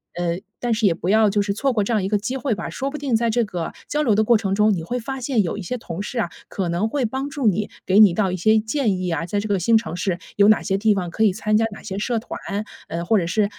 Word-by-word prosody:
呃， 175 Hz, 0 st, -1 dB, 0.2 s
但 240 Hz, -1 st, 0 dB
是 220 Hz, 0 st, 0 dB
也 180 Hz, -, +3 dB
不 170 Hz, -, -5 dB
要 215 Hz, +1 st, +5 dB
就 205 Hz, +1 st, +1 dB
是 200 Hz, 0 st, -1 dB
错 270 Hz, +7 st, 0 dB
过 220 Hz, -4 st, +1 dB
这 235 Hz, -, -1 dB
样 210 Hz, -3 st, +1 dB
一 190 Hz, -, -1 dB
个 210 Hz, -, +2 dB
机 230 Hz, +6 st, -3 dB
会 265 Hz, -4 st, -1 dB
吧。 -, -, -5 dB
说 275 Hz, -, -3 dB
不 300 Hz, -, -5 dB
定 275 Hz, -5 st, 0 dB
在 230 Hz, +1 st, +1 dB
这 235 Hz, +1 st, +1 dB
个 175 Hz, -5 st, -4 dB, 0.2 s
交 295 Hz, -, 0 dB
流 225 Hz, -7 st, +3 dB
的 215 Hz, -, +3 dB
过 235 Hz, +1 st, +5 dB
程 195 Hz, -2 st, -1 dB
中， 210 Hz, +1 st, +4 dB
你 170 Hz, -4 st, -3 dB
会 245 Hz, +9 st, -3 dB
发 265 Hz, +3 st, -5 dB
现 245 Hz, -3 st, +1 dB
有 175 Hz, -, -3 dB
一 -, -, -5 dB
些 250 Hz, +7 st, -4 dB
同 180 Hz, -5 st, -6 dB
事 235 Hz, +4 st, -4 dB
啊， 200 Hz, -, 0 dB, 0.2 s
可 190 Hz, -3 st, -2 dB
能 175 Hz, +6 st, 0 dB
会 270 Hz, 0 st, 0 dB
帮 265 Hz, +5 st, -3 dB
助 280 Hz, -5 st, -1 dB
你， 210 Hz, +1 st, +1 dB, 0.2 s
给 190 Hz, +2 st, +4 dB
你 205 Hz, -5 st, +8 dB
到 190 Hz, -1 st, +1 dB
一 -, -, -2 dB
些 215 Hz, +5 st, +4 dB
建 220 Hz, -2 st, 0 dB
议 185 Hz, -1 st, -2 dB
啊， 165 Hz, 0 st, -1 dB
在 205 Hz, +4 st, -1 dB
这 210 Hz, -, -3 dB
个 200 Hz, -2 st, +1 dB
新 225 Hz, +6 st, +4 dB
城 220 Hz, -6 st, -4 dB
市 180 Hz, 0 st, -1 dB, 0.2 s
有 200 Hz, +1 st, +5 dB
哪 215 Hz, -, +5 dB
些 195 Hz, -1 st, 0 dB
地 215 Hz, +1 st, +3 dB
方 180 Hz, -3 st, -2 dB
可 220 Hz, -, 0 dB
以 210 Hz, -, +5 dB
参 215 Hz, +2 st, -1 dB
加 225 Hz, +1 st, +3 dB
哪 210 Hz, -, -10 dB
些 195 Hz, -2 st, -5 dB
社 235 Hz, +2 st, 0 dB
团， 225 Hz, -, -7 dB, 0.5 s
呃， 170 Hz, +1 st, -3 dB
或 220 Hz, +5 st, +3 dB
者 180 Hz, -, +1 dB
是， 205 Hz, +4 st, +2 dB
215 Hz, 335 characters per minute, -22 LUFS, 190-230 Hz, 0.5 s, 你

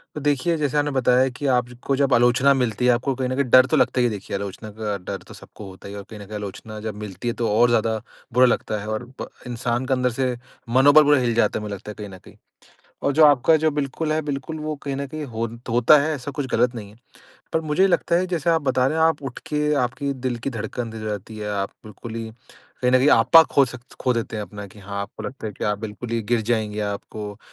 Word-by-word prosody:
तो 150 Hz, -, -5 dB
देखिए 145 Hz, +4 st, +1 dB
जैसे 150 Hz, -2 st, 0 dB
आपने 145 Hz, 0 st, +1 dB
बताया 130 Hz, 0 st, +3 dB
कि 125 Hz, +3 st, -7 dB
आप 125 Hz, -2 st, +2 dB
ज 125 Hz, -, -12 dB
को 140 Hz, -, +2 dB
जब 140 Hz, -2 st, +2 dB
आलोचना 120 Hz, +3 st, +4 dB
मिलती 125 Hz, -3 st, 0 dB
है 125 Hz, -, +6 dB
आपको 125 Hz, +3 st, 0 dB
कहीं 130 Hz, 0 st, -2 dB
न 130 Hz, -, -1 dB
कहीं 140 Hz, -, +1 dB
डर 130 Hz, +1 st, +8 dB
तो 130 Hz, -, +1 dB
लगता 125 Hz, -, +2 dB
ही 120 Hz, -, +4 dB
है, -, -, +3 dB
देखिए 100 Hz, -2 st, -5 dB
आलोचना 100 Hz, +2 st, -6 dB
का 105 Hz, -1 st, -4 dB
डर -, -, -4 dB
तो -, -, -11 dB
सबको 105 Hz, -, -12 dB
होता 95 Hz, +1 st, -12 dB
ही 100 Hz, -, -8 dB
है 100 Hz, -, -6 dB
और 100 Hz, -, -10 dB
कहीं 110 Hz, -, -9 dB
न 100 Hz, -, -9 dB
कहीं 105 Hz, +2 st, -8 dB
आलोचना 105 Hz, +1 st, -7 dB
जब 110 Hz, -1 st, -5 dB
मिलती 105 Hz, +2 st, -6 dB
है 120 Hz, -, +1 dB
तो 115 Hz, -2 st, -1 dB
और 120 Hz, 0 st, +6 dB
ज़्यादा 110 Hz, -1 st, +1 dB, 0.3 s
बुरा 125 Hz, +2 st, +6 dB
लगता 110 Hz, -3 st, 0 dB
है 105 Hz, -, -7 dB
और 110 Hz, +3 st, -3 dB, 0.2 s
ब -, -, -6 dB, 0.2 s
इंसान 120 Hz, +1 st, -2 dB
का 135 Hz, -, +1 dB
अंदर 125 Hz, 0 st, +1 dB
से 125 Hz, 0 st, -1 dB, 0.3 s
मनोबल 145 Hz, +5 st, +7 dB
पूरा 145 Hz, -1 st, +4 dB
हिल 120 Hz, -2 st, +1 dB
जाता 110 Hz, -2 st, +2 dB
है -, -, -7 dB
मुझे 105 Hz, -1 st, -4 dB
लगता 105 Hz, +2 st, -9 dB
है -, -, -11 dB
कहीं 105 Hz, -, -6 dB
न 95 Hz, -, -10 dB
कहीं। -, -, -15 dB, 0.7 s
और 140 Hz, -, +2 dB
जो 155 Hz, +2 st, +5 dB
आपका 145 Hz, +2 st, +5 dB
जो 160 Hz, -, +3 dB
बिल्कुल 150 Hz, +2 st, -2 dB
है, 155 Hz, -, +1 dB
बिल्कुल 145 Hz, +1 st, -4 dB
वो 155 Hz, 0 st, -3 dB
कहीं 140 Hz, -1 st, -3 dB
न 140 Hz, +1 st, -3 dB
कहीं 155 Hz, +2 st, -6 dB, 0.4 s
होता 120 Hz, +6 st, +6 dB
है 155 Hz, +2 st, 0 dB
ऐसा 140 Hz, +1 st, -6 dB
कुछ 140 Hz, 0 st, -3 dB
ग़लत 125 Hz, +2 st, +2 dB
नहीं 105 Hz, -3 st, -7 dB
है। 105 Hz, -, -17 dB, 0.6 s
पर 160 Hz, -, +2 dB
मुझे 160 Hz, +5 st, +2 dB
लगता 175 Hz, -2 st, +2 dB
है 185 Hz, -, +1 dB
जैसे 170 Hz, -3 st, 0 dB
आप 165 Hz, -2 st, +2 dB
बता 130 Hz, -1 st, +2 dB
रहे 155 Hz, +4 st, 0 dB
हैं 160 Hz, -, +4 dB
आप 160 Hz, -3 st, +1 dB
उठ 130 Hz, -3 st, -6 dB
के 150 Hz, 0 st, 0 dB
आपकी 140 Hz, +2 st, -1 dB
दिल 130 Hz, -2 st, -3 dB
की 140 Hz, -, -1 dB
धड़कन 115 Hz, 0 st, -4 dB
तेज़ 110 Hz, -1 st, -8 dB
हो 110 Hz, -, -3 dB
जाती 105 Hz, +1 st, -6 dB
है। 105 Hz, 0 st, -4 dB
आप 100 Hz, -1 st, -2 dB
बिल्कुल 110 Hz, +2 st, -9 dB
ही 115 Hz, -1 st, -5 dB, 0.5 s
कहीं 125 Hz, -, +3 dB
न 130 Hz, -, +6 dB
कहीं 135 Hz, -, +3 dB
आपा 125 Hz, +9 st, +7 dB
खो 140 Hz, -3 st, +3 dB
सक 125 Hz, -1 st, -9 dB, 0.2 s
खो 125 Hz, -, +2 dB
देते 115 Hz, -1 st, -3 dB
हैं 105 Hz, -, -3 dB
अपना 105 Hz, 0 st, -8 dB
कि 100 Hz, -, -16 dB
हाँ, 100 Hz, 0 st, -6 dB
आपको 100 Hz, +2 st, -9 dB
लगता 130 Hz, -2 st, -6 dB
है 105 Hz, -, -5 dB
कि -, -, -3 dB
आप 105 Hz, -1 st, 0 dB
बिल्कुल 110 Hz, +2 st, -7 dB
ही 115 Hz, -, 0 dB
गिर 115 Hz, +2 st, +1 dB
जाएँगे। 110 Hz, -2 st, -1 dB
आपको 105 Hz, 0 st, -5 dB
125 Hz, 270 wpm, -23 LUFS, 110-140 Hz, 0.7 s, डर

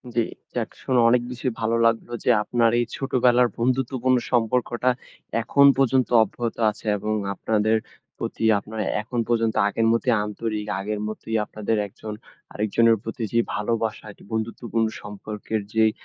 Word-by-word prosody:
জি। -, -, +3 dB, 0.4 s
যাক -, -, -1 dB
শুনে 130 Hz, -2 st, +2 dB
অনেক 125 Hz, +1 st, +4 dB
বেশি 125 Hz, +1 st, -4 dB
ভালো 115 Hz, +1 st, +1 dB
লাগলো 115 Hz, +1 st, +1 dB
যে, -, -, +1 dB
আপনার 115 Hz, 0 st, +2 dB
এই 120 Hz, -, +1 dB
ছোটবেলার 125 Hz, -2 st, +3 dB
বন্ধুত্বপূর্ণ 130 Hz, +1 st, +1 dB
সম্পর্কটা 120 Hz, +1 st, +1 dB, 0.5 s
এখন 140 Hz, +5 st, +4 dB
পর্যন্ত 130 Hz, -1 st, +3 dB
অব্যাহত 115 Hz, +2 st, -4 dB
আছে। 105 Hz, -, -9 dB
এবং 105 Hz, +2 st, -2 dB, 0.2 s
আপনাদের 110 Hz, +2 st, +1 dB, 0.4 s
প্রতি -, -, -4 dB, 0.2 s
আপনার 110 Hz, +2 st, -8 dB, 0.2 s
এখন 120 Hz, +3 st, -4 dB
পর্যন্ত 115 Hz, -2 st, +1 dB
আগের 115 Hz, +2 st, +1 dB
মতই 115 Hz, +2 st, +2 dB
আন্তরিক 105 Hz, 0 st, -4 dB
আগের 105 Hz, +2 st, -3 dB
মতই 110 Hz, +1 st, -5 dB
আপনাদের 110 Hz, +1 st, -2 dB
একজন 105 Hz, +1 st, -8 dB, 0.4 s
আরেকজনের 115 Hz, +2 st, +3 dB
প্রতি 115 Hz, +1 st, -5 dB
যে, 115 Hz, -, +3 dB, 0.2 s
ভালোবাসাটি 110 Hz, -1 st, -3 dB
বন্ধুত্বপূর্ণ 115 Hz, 0 st, -1 dB
সম্পর্কের 105 Hz, +1 st, -5 dB
যেই 110 Hz, -1 st, +4 dB
115 Hz, 140 wpm, -24 LUFS, 110-120 Hz, 0.5 s, অনেক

